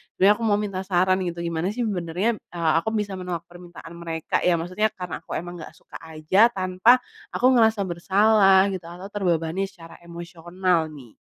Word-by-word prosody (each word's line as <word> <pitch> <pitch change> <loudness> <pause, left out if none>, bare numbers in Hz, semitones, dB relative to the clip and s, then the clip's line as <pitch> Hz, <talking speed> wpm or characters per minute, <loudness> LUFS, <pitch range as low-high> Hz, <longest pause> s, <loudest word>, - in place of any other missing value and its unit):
sebenernya 200 +2 +5
aku - - -4
mau 205 - +3
minta 195 -3 -3
saran 185 0 +2
gitu, 170 -1 -4
gimana 170 +1 -2
sih 245 - -1
sebenernya, 195 +2 -1
eee, 165 -2 -2
aku 220 - -3
bisa 205 -2 -2
menolak 180 -2 -5
permintaan 175 -1 -12
mereka, 165 -2 -3
ya 175 - +4
maksudnya 185 +6 0
karena 180 -3 -6
aku - - -8
emang 175 0 -6
nggak - - -10
suka - - -13
aja 160 +7 +3
tanpa 185 +3 +3 0.4
aku 250 - 0
ngerasa 220 -4 +3
bersalah 195 +2 +4
gitu 180 -3 -6
atau 180 +3 -9
terbebani 180 -1 -1
secara 165 -4 -15
emosional 170 0 -2
nih? 125 -5 -13
180 Hz, 175 wpm, -24 LUFS, 170-195 Hz, 0.4 s, sebenernya